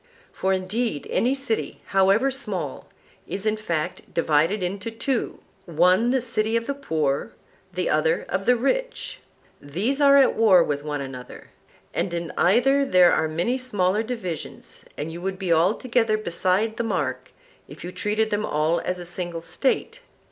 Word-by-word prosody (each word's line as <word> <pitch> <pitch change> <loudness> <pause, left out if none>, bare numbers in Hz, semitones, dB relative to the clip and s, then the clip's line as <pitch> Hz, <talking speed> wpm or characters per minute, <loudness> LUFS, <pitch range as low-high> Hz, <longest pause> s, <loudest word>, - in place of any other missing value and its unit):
For 190 - -1
indeed 190 - -1
any 255 +4 +2
city, 265 -5 -2
however 195 +7 +3
small, 190 - -4 0.4
is 200 +2 -4
in 215 0 +2
fact 175 -6 -4
divided 165 +5 +2
into 195 +4 -3
two, 230 +3 -2 0.3
one 180 +7 +3
the 260 0 +2
city 225 -2 -1
of 230 - -3
the 280 - -2
poor, 155 - -2 0.4
the 180 -1 -2
other 160 +2 +1
of 190 +1 -3
the 250 - +6
rich; - - -2 0.4
these 205 - -2
are 280 -1 +7
at 275 - +5
war 195 -6 +6
with 145 -2 -2
one 150 -1 -3
another; 130 -2 -9 0.4
and 175 -3 -1
in 170 -1 -4
either 260 +9 +3
there 185 -9 +5
are 160 - +2
many 175 +12 -1
smaller 205 -5 +1
divisions, 220 -8 -6 0.2
and 155 +2 -4
you 170 +1 -8
would 190 +1 -3
be 185 -3 +1
altogether 220 +6 +2
beside 195 +3 0
the - - -1
mark 130 - -2 0.4
if 145 - -11
you 175 - -5
treated 215 +3 -1
them 205 0 0
all 155 -1 +1
as 180 +2 -3
a 175 - -7
single 175 -1 -5
State. 275 - -1
190 Hz, 160 wpm, -24 LUFS, 170-230 Hz, 0.4 s, are